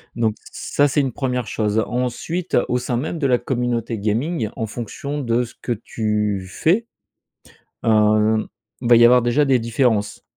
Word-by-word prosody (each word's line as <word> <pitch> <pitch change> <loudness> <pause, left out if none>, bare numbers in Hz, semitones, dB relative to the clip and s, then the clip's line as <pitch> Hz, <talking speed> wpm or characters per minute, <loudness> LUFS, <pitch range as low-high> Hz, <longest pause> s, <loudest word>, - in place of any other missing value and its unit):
donc 110 -2 0 0.2
ç - - -8
ça 145 0 +5
c'est 145 +2 +1
une 135 -2 -1
1re 125 -3 -2
chose. 105 +1 0
Ensuite 125 +9 -2
au 125 - +2
sein 125 -1 -2
même 160 +6 -3
de 140 - +1
la 125 -2 +3
communauté 120 -2 -2
gaming 110 +4 -1
en 110 - -2
fonction 125 +6 -5
de 120 -1 +1
ce 120 - -10
que - - -4
tu 105 -3 -2
fais, 185 - +1 1.0
hem, 110 0 +3 0.3
va 120 -1 +5
y 120 - +7
avoir 125 +1 +6
déjà 120 +5 +2
des 135 -2 +3
différences 115 -3 0
120 Hz, 170 wpm, -21 LUFS, 110-130 Hz, 1.0 s, y